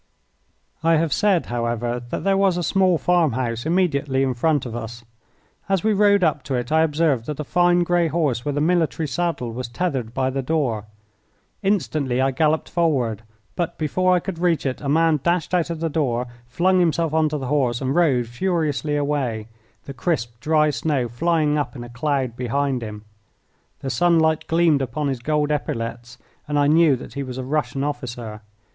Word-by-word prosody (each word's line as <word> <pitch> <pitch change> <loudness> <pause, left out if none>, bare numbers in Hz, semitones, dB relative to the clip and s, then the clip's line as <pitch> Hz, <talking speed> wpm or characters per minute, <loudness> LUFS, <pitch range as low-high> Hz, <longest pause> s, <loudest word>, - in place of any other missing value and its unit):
I 165 +1 +3
have 160 -1 +1
said, 200 -5 +2
however, 120 0 -2
that - - -4
there 195 0 +2
was 195 -2 +2
a 175 - -1
small 185 0 +3
farm 175 -5 +2
house 120 +1 -2
immediately 145 -6 +1
in 130 -1 0
front 145 +3 +1
of 120 -2 -6
us. 115 0 -7 0.6
As 195 -3 +1
we 220 - +3
rode 200 -1 +4
up 155 -3 +2
to 135 - -2
it 120 +1 -3
I 160 0 +4
observed 150 -6 +1
that 150 -1 -4
a - - -1
fine 175 +3 +3
grey 175 -1 +2
horse 150 -8 0
with 145 0 -2
a - - +1
military 165 -1 +1
saddle 165 -6 -2
was 125 +2 -5
tethered 130 -4 -2
by 130 +2 -1
the 135 +1 -2
door. 130 -7 -1 0.8
Instantly 155 - 0
I 135 +1 +2
galloped 155 +3 +1
forward, 130 - 0 0.3
but 175 -2 -2
before 185 +4 +2
I - - +3
could 175 -2 -6
reach 170 -4 +1
it 130 -1 -2
a 140 - -3
man 160 0 +3
dashed 170 +3 0
out 175 -2 +1
of 165 -1 -4
the 165 - +1
door, 130 -6 -1 0.2
flung 180 +9 +2
himself 165 -2 +1
on 160 -1 +3
to 150 - -2
the 135 - -5
horse, 125 -3 +1
and 130 0 -1
rode 145 -8 +3
furiously 150 +2 -1
away, 135 -7 -1 0.4
the 140 - -7
crisp, 120 -5 -2
dry 155 +3 +2
snow 140 -4 -1
flying 150 +3 +1
up 145 - -3
in 120 - -7
a 120 - -9
cloud 130 -1 -1
behind 130 +1 -1
him. 105 -1 -7 0.8
The 135 - -3
sunlight 160 -3 +2
gleamed 165 -3 +3
upon 135 +3 -2
his 130 -3 -2
gold 150 +3 0
epaulettes, 120 -4 -4 0.3
and 145 0 -1
I 145 - +3
knew 155 -1 +5
that 125 - -10
he 140 - -4
was 130 -2 -6
a 130 - -3
Russian 135 -1 -1
officer. 120 -7 -5
145 Hz, 190 wpm, -22 LUFS, 125-165 Hz, 0.8 s, knew